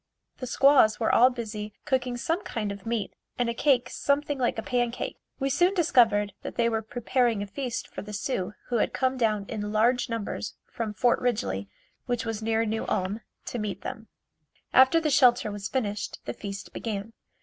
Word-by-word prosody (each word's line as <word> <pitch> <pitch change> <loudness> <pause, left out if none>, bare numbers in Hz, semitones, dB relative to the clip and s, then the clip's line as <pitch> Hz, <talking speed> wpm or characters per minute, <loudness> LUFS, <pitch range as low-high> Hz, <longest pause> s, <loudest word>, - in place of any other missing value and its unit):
The 255 - -5
squaws 260 -4 +5
were 225 - +2
all 250 +2 +7
busy 215 -4 -5
cooking 255 -3 0
some 330 +9 -1
kind 210 - -3
of 200 +1 -8
meat 225 -4 -2 0.2
and 245 -1 +1
a - - -3
cake 250 -1 +3
something 285 0 0
like 245 -2 +1
a 225 - -3
pancake. 245 -1 -1 0.2
We 275 0 0
soon 355 +7 +3
discovered 230 - +4
that - - -6
they 235 - +2
were 220 -1 0
preparing 235 -1 0
a - - -4
feast 240 +4 -4
for - - -7
the 210 - -9
Sioux 205 -2 -2
who 240 - +1
had - - +1
come 260 0 +1
down 215 -5 +1
in 210 -2 -4
large 240 +4 +2
numbers 225 -2 -4
from 220 -3 -5
Fort 240 +4 +3
Ridgely 100 - -1 0.4
which 245 -2 -1
was 225 -1 -3
near 225 +1 +1
New 220 0 -2
Ulm 195 +4 -1 0.2
to 240 - -4
meet 210 -2 -3
them. 225 -4 -6 0.7
After 265 +5 +7
the 310 -2 0
shelter 245 -5 +5
was 205 0 -4
finished 210 -6 -2
the - - -3
feast 200 -1 -7
began. 215 0 -4
230 Hz, 190 wpm, -27 LUFS, 210-255 Hz, 0.7 s, all